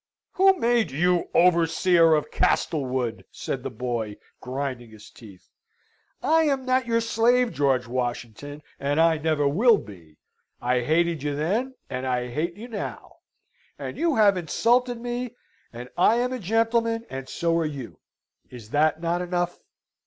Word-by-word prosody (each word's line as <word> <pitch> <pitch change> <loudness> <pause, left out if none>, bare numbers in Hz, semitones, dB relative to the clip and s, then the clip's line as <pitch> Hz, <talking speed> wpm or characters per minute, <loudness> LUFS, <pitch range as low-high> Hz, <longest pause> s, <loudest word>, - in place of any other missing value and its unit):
"Who 385 0 +4
made 235 - +2
you 175 +5 +1
the - - 0
overseer 170 -1 +4
of 150 - -2
Castlewood?" 130 -6 0
said - - -4
the - - -4
boy, 115 -3 -4 0.2
grinding 130 -2 -5
his 110 -1 -15
teeth. 100 -6 -16 0.7
"I 320 0 +3
am 275 -3 0
not 255 -1 +1
your 230 0 +2
slave, 230 +2 +2
George 135 -3 +1
Washington, 125 +3 -4 0.2
and 145 +2 0
I 165 -1 +4
never 155 -2 +1
will 215 - +4
be. 85 - -13 0.4
I 125 +1 +1
hated 165 +3 +1
you 145 0 -2
then, 215 - -1
and 130 0 -4
I 125 -1 -1
hate 170 +7 -2
you 220 +4 -9
now. 220 -4 -7 0.6
And - - -6
you 330 -3 +1
have 205 -3 +4
insulted 240 +8 +1
me, 245 0 -4 0.4
and 120 +1 -8
I 195 +6 +4
am 250 +2 0
a 255 - -4
gentleman, 225 +2 0
and 130 0 -6
so 170 -1 0
are - - +1
you. 125 - -8 0.5
Is 115 -3 -12
that 155 +2 +2
not 170 +1 0
enough?" 175 0 -2
165 Hz, 155 wpm, -25 LUFS, -, 0.7 s, Who